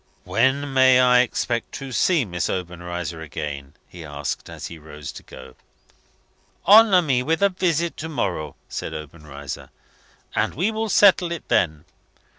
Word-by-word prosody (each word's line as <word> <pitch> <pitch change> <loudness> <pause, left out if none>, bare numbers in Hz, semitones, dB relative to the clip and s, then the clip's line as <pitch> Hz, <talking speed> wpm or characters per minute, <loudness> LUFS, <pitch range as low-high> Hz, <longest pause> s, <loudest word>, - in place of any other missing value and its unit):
"When 140 +1 +1
may 130 -1 +6
I 125 -1 +5
expect 120 -1 -1
to 135 -1 -7
see 155 +2 +2
Miss 90 -3 -3
Obenreizer 90 -2 -5
again?" 70 -2 -6
he 85 -2 -11
asked, 75 -1 -5
as - - -8
he 85 - -8
rose 75 -1 -9
to - - -11
go. - - -13 1.1
"Honour 205 -3 +7
me 130 -5 +1
with 160 +8 0
a 200 - +5
visit 170 -3 -1
to 160 - -5
morrow," 90 - -3
said 80 - -5
Obenreizer, 75 -3 -8 0.6
"and - - 0
we 190 +9 0
will 220 0 -3
settle 190 -4 +5
it 170 - -6
then. 80 -4 +1
120 Hz, 150 wpm, -23 LUFS, -, 1.1 s, Honour